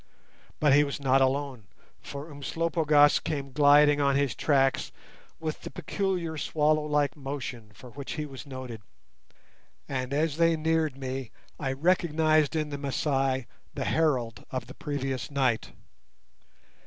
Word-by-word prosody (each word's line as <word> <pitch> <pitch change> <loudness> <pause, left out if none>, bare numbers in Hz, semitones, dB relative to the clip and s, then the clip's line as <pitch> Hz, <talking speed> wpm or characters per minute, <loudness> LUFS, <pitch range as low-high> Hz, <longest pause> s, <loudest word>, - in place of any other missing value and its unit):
But 150 -3 +4
he 145 +1 +6
was 140 0 -4
not 135 -1 +3
alone, 135 -5 -1 0.3
for 145 +3 -8
Umslopogaas 150 0 +3
came 140 -3 -4
gliding 145 +1 +5
on 140 -1 +3
his 140 -2 +1
tracks 135 -3 +1 0.5
with 155 -1 -4
the - - -7
peculiar 180 -6 -2
swallow 155 0 +2
like 145 -1 +1
motion 135 -6 -6
for 125 - -13
which 140 +3 -6
he 150 -1 -3
was 135 0 -10
noted, 130 -4 -7 1.1
and 130 -2 -3
as 150 +1 0
they 165 -1 +3
neared 160 -3 0
me 130 -2 -4 0.3
I 135 -3 -1
recognized 155 -1 +2
in 155 -1 -1
the 145 -1 -5
Masai 135 -2 0 0.3
the - - -2
herald 130 -8 0
of 130 - -4
the - - -11
previous 135 -5 -3
night. 130 -5 0
145 Hz, 140 wpm, -28 LUFS, 135-155 Hz, 1.1 s, he